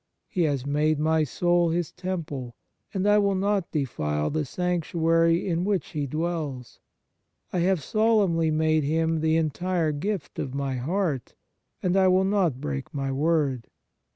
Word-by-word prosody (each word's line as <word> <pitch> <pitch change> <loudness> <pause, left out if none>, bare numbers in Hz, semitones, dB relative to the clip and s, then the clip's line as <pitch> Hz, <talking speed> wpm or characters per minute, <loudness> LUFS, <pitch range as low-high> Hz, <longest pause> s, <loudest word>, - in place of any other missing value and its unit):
He 185 - -2
has 140 -4 -1
made 150 +2 +1
my 160 +1 +2
soul 175 +3 +2
His 170 0 -1
temple, 160 -10 -5 0.4
and 195 0 -1
I 205 0 +5
will 200 -1 +2
not 195 -1 0
defile 75 - -1
the 155 0 -1
sanctuary 165 0 +1
in 170 -1 0
which 195 -1 -1
He 150 -3 -3
dwells. 155 -4 -4 0.7
I 180 - +1
have 180 -3 +1
solemnly 205 -7 +2
made 155 0 +2
Him 160 +2 +1
the 160 +1 +2
entire 165 +1 0
gift 185 +4 -4
of 130 0 -4
my 135 -2 -2
heart, 155 -1 -2 0.5
and 180 0 +1
I 190 -1 +5
will 185 +1 +4
not 190 -9 +1
break 140 -2 -4
my 135 -2 -2
word. 140 -4 0
160 Hz, 155 wpm, -26 LUFS, 145-180 Hz, 0.7 s, I